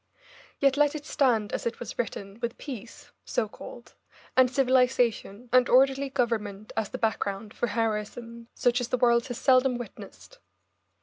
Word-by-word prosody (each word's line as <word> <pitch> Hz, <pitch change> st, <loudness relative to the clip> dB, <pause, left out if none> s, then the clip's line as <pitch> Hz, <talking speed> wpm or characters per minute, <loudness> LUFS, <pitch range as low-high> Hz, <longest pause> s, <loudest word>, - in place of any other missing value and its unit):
Yet 275 Hz, 0 st, +2 dB
let 295 Hz, +1 st, +3 dB
it 295 Hz, -1 st, -6 dB
stand 235 Hz, -8 st, +1 dB
as -, -, -2 dB
it 235 Hz, -, -4 dB
was 235 Hz, -2 st, -8 dB
written, 200 Hz, -2 st, -4 dB
with 235 Hz, 0 st, -4 dB
peace 245 Hz, -5 st, -9 dB
so -, -, -1 dB
called, -, -, -12 dB, 0.4 s
and 255 Hz, -1 st, +5 dB
civilisation, 250 Hz, -4 st, +1 dB
and 255 Hz, -1 st, +5 dB
orderly 270 Hz, +2 st, +4 dB
government 215 Hz, -6 st, -2 dB
as 220 Hz, -2 st, -1 dB
the -, -, -5 dB
background 205 Hz, -1 st, -2 dB
for 240 Hz, -, -1 dB
heroism 230 Hz, +1 st, -3 dB
such 245 Hz, 0 st, +2 dB
as 245 Hz, -, -2 dB
the 255 Hz, -, 0 dB
world 235 Hz, 0 st, +3 dB
has 245 Hz, -3 st, -5 dB
seldom 255 Hz, -1 st, +3 dB
witnessed. 245 Hz, -, -11 dB
240 Hz, 160 wpm, -27 LUFS, 225-260 Hz, 0.4 s, and